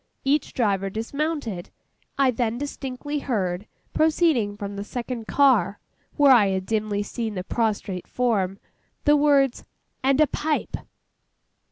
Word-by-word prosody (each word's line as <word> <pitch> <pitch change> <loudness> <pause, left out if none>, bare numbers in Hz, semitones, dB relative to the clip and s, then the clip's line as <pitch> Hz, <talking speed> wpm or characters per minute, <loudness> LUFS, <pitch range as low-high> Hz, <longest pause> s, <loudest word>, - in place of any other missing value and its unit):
Each 285 +2 +1
driver 195 -5 0
dismounted. 230 - -3 0.5
I 270 -2 +4
then 235 -1 -1
distinctly 285 +1 -4
heard, 195 -7 -2 0.3
proceeding 305 -10 +2
from 200 -1 -5
the 200 - -4
second 235 0 -5
car, 260 -7 +3 0.4
where 285 -2 +6
I 230 -6 +6
had 190 -1 -1
dimly 210 -1 -1
seen 220 0 -4
the 185 - -3
prostrate 205 -4 -2
form, 200 -6 0 0.5
the 295 - +6
words: 285 -3 +3 0.4
'And 270 +1 +3
a 305 - +7
pipe! 300 +2 -2
235 Hz, 130 wpm, -24 LUFS, 205-280 Hz, 0.5 s, a